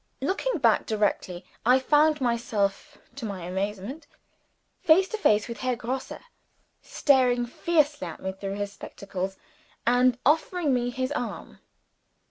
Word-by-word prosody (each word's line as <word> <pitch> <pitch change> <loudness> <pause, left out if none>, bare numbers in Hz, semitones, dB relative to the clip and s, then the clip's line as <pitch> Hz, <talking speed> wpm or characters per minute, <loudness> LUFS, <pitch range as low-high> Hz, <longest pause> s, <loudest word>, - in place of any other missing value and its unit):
Looking 390 - -1
back 235 -7 +3
directly, 200 -4 -1 0.2
I 250 +3 +5
found 300 +3 +3
myself, 225 -5 -1 0.2
to 270 - -7
my 200 -5 -5
amazement, 200 - -4 0.7
face 360 +4 +5
to 440 - -3
face 210 - +3
with 235 0 -7
Herr 255 -1 0
Grosse 255 +3 -4 0.7
staring 250 -4 +2
ferociously 295 - 0
at 165 - -8
me 190 - -3
through 195 +1 -5
his 205 0 -4
spectacles, 195 -1 -6 0.5
and 245 0 +4
offering 315 +1 +2
me 245 -1 0
his 255 +2 -3
arm! 245 -5 -5
245 Hz, 130 wpm, -26 LUFS, 200-285 Hz, 0.7 s, I